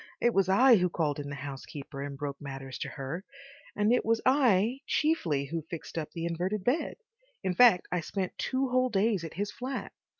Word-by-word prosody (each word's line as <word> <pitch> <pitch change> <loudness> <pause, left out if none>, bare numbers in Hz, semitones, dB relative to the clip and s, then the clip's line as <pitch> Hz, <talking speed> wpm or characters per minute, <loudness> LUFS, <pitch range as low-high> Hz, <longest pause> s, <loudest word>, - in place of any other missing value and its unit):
It 240 0 +3
was 195 -1 +2
I 240 +5 +7
who 180 -1 +2
called 150 -4 -1
in 145 -1 -5
the 140 - -5
housekeeper 140 0 -7
and 140 0 -5
broke 140 -1 -5
matters 135 -3 -7
to - - -3
her, 150 +6 -5 0.5
and 210 +3 +3
it 250 - +2
was 225 0 +2
I 250 -3 +4
chiefly 170 - +1
who 165 +4 -3
fixed 170 - -7
up 160 -2 -3
the 165 -1 -4
inverted 180 +4 -2
bed. 260 - 0 0.5
In 185 - 0
fact, 225 -3 +6
I 180 - +1
spent 185 +3 -3
two 265 0 0
whole 255 0 +2
days 205 -3 +1
at 165 - -7
his 205 +3 -2
flat. 260 +2 -5
180 Hz, 200 wpm, -29 LUFS, 145-235 Hz, 0.5 s, I